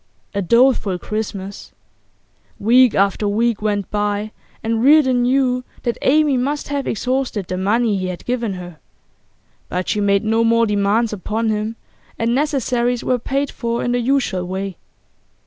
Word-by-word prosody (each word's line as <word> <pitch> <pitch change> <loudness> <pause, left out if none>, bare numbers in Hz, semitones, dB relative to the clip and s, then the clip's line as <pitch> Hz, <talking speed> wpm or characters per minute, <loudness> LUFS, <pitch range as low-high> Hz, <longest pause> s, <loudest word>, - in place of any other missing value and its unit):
A 200 - -1
doleful 235 -2 +3
Christmas. 200 0 -5 0.8
Week 245 +3 +4
after 200 +1 +1
week 225 +1 0
went 205 -3 -1
by 205 0 -1 0.3
and 225 0 0
Reardon 265 -3 +5
knew 250 0 +1 0.2
that 235 - -2
Amy 295 -1 +3
must 285 +4 -2
have 285 -1 -2
exhausted 250 -3 -1
the 185 - -4
money 210 +4 +1
he 185 - -2
had 180 -1 -6
given 235 -5 -2
her. 175 -3 -9 0.9
But 180 0 -3
she 210 - 0
made 200 +1 +2
no 225 +1 +2
more 230 0 +3
demands 210 +2 +1
upon 220 +3 -2
him, 215 +1 -2 0.4
and 230 +1 0
necessaries 250 -4 0
were 250 -1 +1
paid 275 +3 -2
for 235 0 -3
in 245 - 0
the 245 - +1
usual 240 -8 0
way. 190 0 -4
225 Hz, 150 wpm, -19 LUFS, 200-250 Hz, 0.9 s, Reardon